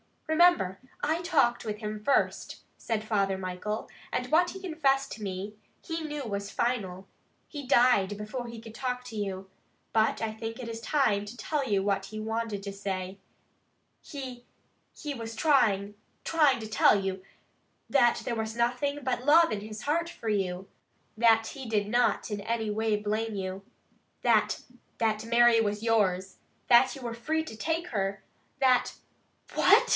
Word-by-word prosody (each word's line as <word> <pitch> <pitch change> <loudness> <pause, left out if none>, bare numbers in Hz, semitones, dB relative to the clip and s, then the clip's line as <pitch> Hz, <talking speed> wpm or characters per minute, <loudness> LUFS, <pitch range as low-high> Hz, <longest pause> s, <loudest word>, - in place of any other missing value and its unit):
"Remember, 315 - +4 0.2
I 315 +3 +1
talked 290 -9 +2
with 210 -1 -3
him 210 -1 -5
first," 275 - 0 0.2
said 225 -2 -2
Father 200 -3 0
Michael, 190 +3 -4 0.2
"and 250 +2 -2
what 350 +3 +4
he 385 - -9
confessed 275 -6 +1
to 220 - -7
me, 195 +1 -5 0.3
he 325 -1 -4
knew 295 -2 -4
was 200 -3 -4
final. 200 -7 -2 0.4
He 285 -4 -7
died 240 -6 +4
before 225 +4 -5
he 230 -1 -8
could 225 -1 -11
talk 250 +1 -3
to 230 - -8
you, 190 -2 -4 0.4
but 220 0 +2
I 225 -1 -1
think 225 +1 -6
it 245 -3 -6
is 225 0 -5
time 220 -5 +1
to 205 +4 -9
tell 280 +4 -2
you 195 -2 +2
what 195 -1 0
he 215 +2 -7
wanted 220 -2 -3
to 200 - -4
say. 195 -1 -4 0.8
He 255 -4 -8 0.5
he 295 -2 -4
was 230 -3 -6
trying 210 -8 +2 0.3
trying 295 -6 +3
to 220 - -5
tell 215 -1 +4
you, 190 -1 -3 0.7
that 240 -4 +4
there 240 - -2
was 220 -1 -3
nothing 250 +5 0
but 250 -1 -1
love 330 +3 +6
in 210 - -1
his 215 +1 -8
heart 335 +3 0
for 230 -9 -5
you. 190 -2 -1 0.5
That 225 -1 +4
he 265 -3 -7
did 210 -2 0
not 240 -1 +1
in 205 - -2
any 220 0 -1
way 220 0 +1
blame 215 +1 -2
you. 190 0 -4 0.6
That - - +3 0.4
that 220 -1 0
Mary 235 0 +5
was 210 0 -1
yours. 195 -5 +1 0.3
That 245 +2 +6
you 270 - -10
were 235 -2 -4
free 315 +7 -1
to 315 - -9
take 330 +6 -1
her. 195 -2 -2 0.4
That 255 -2 +3 0.3
" - - -24
"What!" 460 +6 +5
225 Hz, 170 wpm, -29 LUFS, 205-265 Hz, 0.8 s, love